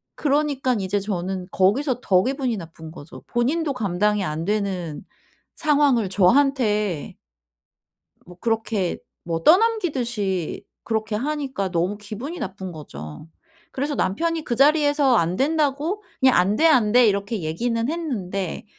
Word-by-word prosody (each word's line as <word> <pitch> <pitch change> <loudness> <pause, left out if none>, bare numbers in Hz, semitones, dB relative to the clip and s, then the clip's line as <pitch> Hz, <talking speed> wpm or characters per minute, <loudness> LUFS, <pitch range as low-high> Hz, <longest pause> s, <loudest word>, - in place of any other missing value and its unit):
그러니깐 275 -6 0
이제 190 +2 0
저는 190 -2 -3
거기서 245 +7 +2
더 185 -6 +3
기분이 260 -3 -1
나쁜 160 -2 -10
거죠. 155 -2 -11
본인도 280 +5 0
감당이 210 -2 0
안 155 +1 -3
되는 190 -6 -2 0.5
상황을 285 - +2
저한테 210 - +2 1.1
뭐 180 0 -14
그렇게 225 -5 -1 0.3
뭐 165 -1 -3
떠넘기듯이 255 - +1 0.2
그렇게 220 -1 -2
하니까 265 -5 -2
너무 180 +4 0
기분이 225 - -7
나쁜 190 -1 -5
거죠. 75 - -9 0.4
그래서 285 +2 -2
남편이 330 - -1
그 240 - -2
자리에서 290 -1 +4
안 170 +2 +1
된다고 300 - 0 0.2
그냥 260 -1 +5
"안 190 +4 +3
돼, 325 - +2
안 240 -9 +4
돼." 250 -1 +7
이렇게 200 +1 -1
얘기는 230 +10 -1
했는데 205 - -3
220 Hz, 285 characters per minute, -23 LUFS, 185-280 Hz, 1.1 s, 돼